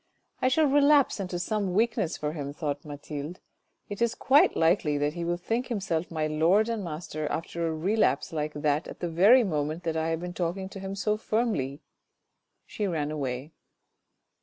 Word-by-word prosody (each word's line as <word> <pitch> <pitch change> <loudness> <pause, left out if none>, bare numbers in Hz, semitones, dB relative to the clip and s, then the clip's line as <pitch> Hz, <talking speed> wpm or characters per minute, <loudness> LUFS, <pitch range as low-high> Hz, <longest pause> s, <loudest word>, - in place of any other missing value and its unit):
" - - -41
I - - +3
shall 305 +5 +3
relapse 285 -2 +4
into 180 -2 -3
some 195 0 -1
weakness 220 -5 +1
for 150 0 -3
him," 145 -3 -5
thought 145 -2 -3
Mathilde; 145 +3 -7 0.3
" - - -48
it 205 +2 -7
is 235 -1 +2
quite 280 +3 +4
likely 160 -3 +2
that 145 +1 0
he 170 0 -4
will 175 +1 -1
think 230 +8 -2
himself 190 -8 -2
my 155 -2 -1
lord 165 +9 +3
and 225 -3 -2
master 155 -2 -4
after 165 +2 -3
a - - -1
relapse 180 -2 +1
like 150 -1 -2
that 150 +1 0
at - - -9
the 175 - -2
very 205 +10 +6
moment 155 -2 -2
that 165 -2 -2
I 160 0 0
have 165 0 -1
been 180 0 -5
talking 185 +2 -3
to 195 - -9
him 195 0 -5
so 210 +2 0
firmly." 215 - -1 0.8
She 210 - -3
ran 155 -4 -1
away. 135 -1 -4
170 Hz, 190 wpm, -28 LUFS, 155-210 Hz, 0.8 s, very